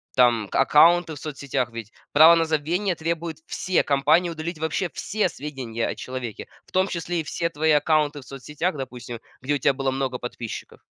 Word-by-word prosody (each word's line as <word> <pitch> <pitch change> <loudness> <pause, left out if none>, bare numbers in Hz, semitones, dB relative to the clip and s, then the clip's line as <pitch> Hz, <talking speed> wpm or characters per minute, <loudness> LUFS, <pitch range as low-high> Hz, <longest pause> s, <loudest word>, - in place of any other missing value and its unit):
там, 120 -4 +4
аккаунты 165 +1 +5
в - - -10
соцсетях, 140 -5 -3
ведь 115 -2 -7 0.2
право 160 +3 +8
на 165 -1 +2
забвение 165 +5 0
требует 165 0 -3
все 185 -1 0
компании 150 +5 +3
удалить 165 0 -5
вообще 160 +3 -1
все 210 -1 -1
сведенья 130 -8 -4
о - - -3
человеке. 125 -4 -6 0.2
В - - -23
том 185 +1 +2
числе 175 -1 -3
и - - -2
все 170 +2 -2
твои 160 0 +1
аккаунты 150 0 +2
в - - -16
соцсетях, 150 +6 -3
допустим, 125 -3 -7 0.2
где 145 +3 0
у - - +1
тя 140 +1 +2
было 135 0 -1
много 130 -1 -2
подписчиков. 120 -2 -7
150 Hz, 180 wpm, -24 LUFS, 130-165 Hz, 0.2 s, право